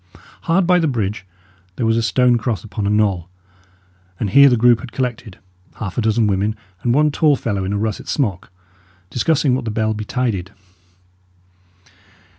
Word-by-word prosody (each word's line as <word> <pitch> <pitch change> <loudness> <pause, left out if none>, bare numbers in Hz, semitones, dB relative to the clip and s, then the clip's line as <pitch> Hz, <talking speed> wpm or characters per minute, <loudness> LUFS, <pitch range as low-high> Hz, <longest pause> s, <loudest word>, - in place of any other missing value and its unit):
Hard 175 +3 +3
by 180 0 +4
the 165 - +1
bridge, 105 -6 -3 0.5
there 120 - -2
was 115 0 +2
a 115 - +1
stone 125 +2 +3
cross 110 -5 -3
upon 105 -2 -4
a - - +1
knoll, 100 -5 +1 0.9
and 105 -4 -2
here 140 +4 +7
the 125 - +2
group 120 0 +4
had 130 -3 -9
collected 120 -6 -4 0.4
half 95 -4 -6
a - - 0
dozen 110 +1 +2
women 105 +1 0 0.3
and 120 - 0
one 150 +4 +3
tall 150 0 +3
fellow 100 -6 -3
in 95 - -3
a - - 0
russet 110 0 -3
smock 100 - -2 0.6
discussing 140 +2 +1
what 130 0 -1
the - - -2
bell 110 0 0
betided. 105 -3 -3
110 Hz, 170 wpm, -19 LUFS, 105-125 Hz, 0.9 s, here